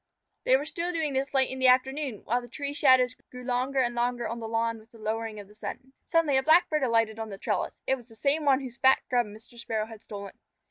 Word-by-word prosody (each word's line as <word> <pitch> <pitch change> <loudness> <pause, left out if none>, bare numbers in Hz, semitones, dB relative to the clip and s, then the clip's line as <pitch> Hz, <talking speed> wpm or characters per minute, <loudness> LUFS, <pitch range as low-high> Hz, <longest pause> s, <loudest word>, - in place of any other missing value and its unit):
They 260 - +5
were 285 - -4
still 340 +3 -3
doing 320 -4 -1
this 270 +1 -1
late 265 -2 +2
in 260 - -5
the 260 - +4
afternoon, 265 -1 +2
while 245 +2 +1
the 240 - -11
tree 280 +3 -4
shadows 260 -5 +5 0.2
grew 250 0 -10
longer 255 +2 -1
and 240 -1 0
longer 240 0 -1
on 235 +1 -4
the 225 - -5
lawn 230 0 -1
with 220 +1 -19
the 230 - -17
lowering 220 0 -3
of 200 - -10
the 210 - -18
sun. 260 +5 -8
Suddenly 325 -5 +3
a - - +4
Blackbird 315 0 +4
alighted 225 -3 +1
on 220 -1 -4
the 195 - -7
trellis. - - -3
It - - +2
was 245 -1 -15
the 225 - -15
same 285 +6 +1
one 275 -2 +4
whose 255 -2 -8
fat 265 0 +5
Grub 245 -2 +2
Mr. 220 +3 -13
Sparrow 220 -2 -2
had 220 -1 -12
stolen. 200 -2 -8
250 Hz, 250 wpm, -28 LUFS, 225-270 Hz, 0.2 s, They